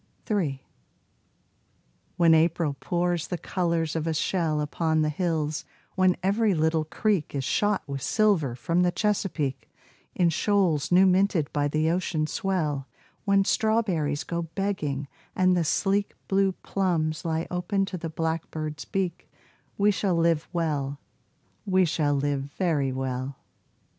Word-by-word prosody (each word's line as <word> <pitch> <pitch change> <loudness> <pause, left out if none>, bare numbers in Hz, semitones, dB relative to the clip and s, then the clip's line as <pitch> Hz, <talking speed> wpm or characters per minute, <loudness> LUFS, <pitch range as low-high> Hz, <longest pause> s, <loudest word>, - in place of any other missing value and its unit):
3 160 - -1 1.5
When 170 -2 +6
April 160 -2 +2
pours 175 0 -1
the 180 - -3
colors 170 -3 -1
of 160 0 -1
a 160 - 0
shell 160 -2 0
Upon 155 +1 0
the 155 - +1
hills, 155 -2 -1 0.3
when 185 -1 +3
every 200 +1 +2
little 160 0 +1
creek 175 -1 -1
Is 135 - -1
shot 205 +9 +1
with 140 -1 -4
silver 165 - +2
from 165 +8 0
the 180 0 +3
Chesapeake 180 -10 -1 0.5
In 175 -2 +3
shoals 180 -5 +1
new 185 +2 +6
minted 185 -5 +2
by 145 -1 +1
the 155 +2 +1
ocean 170 -3 0
swell, 155 -7 -1 0.4
When 200 -1 +3
strawberries 190 -12 +1
go 170 0 -3
begging, 165 -5 -3 0.3
and 185 -1 +3
the 175 - +2
sleek 200 +5 0
Blue 195 -1 +2
plums 165 -5 0
lie 165 0 -1
open 185 +3 0
to 190 -1 -5
the 165 - -4
blackbird's 160 -1 -3
beak, 185 -3 -3 0.5
We 205 +1 +4
shall 190 -1 0
live 165 -2 +2
well 145 -5 -1 0.6
we 185 -1 +3
shall 150 -3 +1
live 140 -1 -1
very 150 -8 +1
well. 130 +1 -3
165 Hz, 140 wpm, -26 LUFS, 150-190 Hz, 1.5 s, When